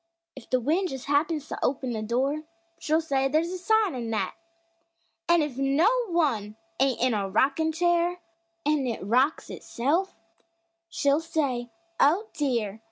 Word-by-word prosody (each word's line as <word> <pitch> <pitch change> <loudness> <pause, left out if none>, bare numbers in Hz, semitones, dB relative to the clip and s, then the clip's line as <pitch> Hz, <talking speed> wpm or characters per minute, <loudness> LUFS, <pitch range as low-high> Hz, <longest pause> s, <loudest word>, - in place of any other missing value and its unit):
If 265 - -12
the 255 - +2
wind 330 +9 0
just 265 -3 -6
happens 300 +1 0
to - - -5
open 255 -2 -1
a 215 - -3
door, 260 +7 0 0.4
She'll 315 +1 +1
say 275 -4 0
there's 315 +5 +1
"a 370 - -5
sign" 435 0 +2
in 240 -3 -4
that! 220 -2 -1 1.0
An' 340 -2 +5
if 275 -3 -5
no 275 +6 +3 0.2
one 265 - 0 0.2
ain't 270 -2 +2
in 255 -1 +3
a 200 -2 -1
rockin' 275 +10 +2
chair 345 +1 +1 0.5
An' 295 -3 +1
it 230 -5 -3
rocks 255 +8 +1
itself, 315 +11 -1 0.7
she'll 290 -2 +1
say: 275 -7 -2 0.3
"Oh, 360 +10 +3
dear! 235 -8 -1
280 Hz, 155 wpm, -26 LUFS, 250-325 Hz, 1.0 s, An